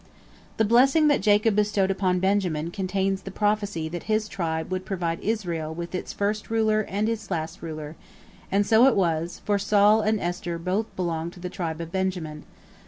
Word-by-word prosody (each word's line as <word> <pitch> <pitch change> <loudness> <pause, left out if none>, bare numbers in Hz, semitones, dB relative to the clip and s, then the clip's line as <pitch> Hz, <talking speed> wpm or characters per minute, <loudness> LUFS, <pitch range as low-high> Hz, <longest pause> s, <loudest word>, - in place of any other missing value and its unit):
The 220 - +3
blessing 270 +7 +5
that 290 - +3
Jacob 210 +1 +3
bestowed 205 -2 +2
upon 185 -2 +1
Benjamin 180 -4 0
contains 195 +1 -1
the 195 - -7
prophecy 205 -4 -1
that 175 +1 -6
his 215 0 +1
tribe 160 -4 -3
would 185 0 -2
provide 175 -4 -2
Israel 170 -8 -2
with 170 +1 -6
his 180 - -4
first 210 +1 -2
ruler 220 -1 +2
and 205 +3 0
his 225 -1 -3
last 165 -3 -3
ruler, 155 -1 -6 0.6
and 200 +1 +3
so 225 +5 +6
it 270 - +4
was, 170 -2 -1
for 205 -1 +2
Saul 205 +2 +4
and 215 0 +1
Esther 175 -1 -3
both 185 +6 -1
belonged 170 -2 -2
to - - -13
the 180 0 -6
tribe 170 -4 -4
of 165 0 -7
Benjamin. 180 -5 -3
190 Hz, 180 wpm, -25 LUFS, 170-210 Hz, 0.6 s, so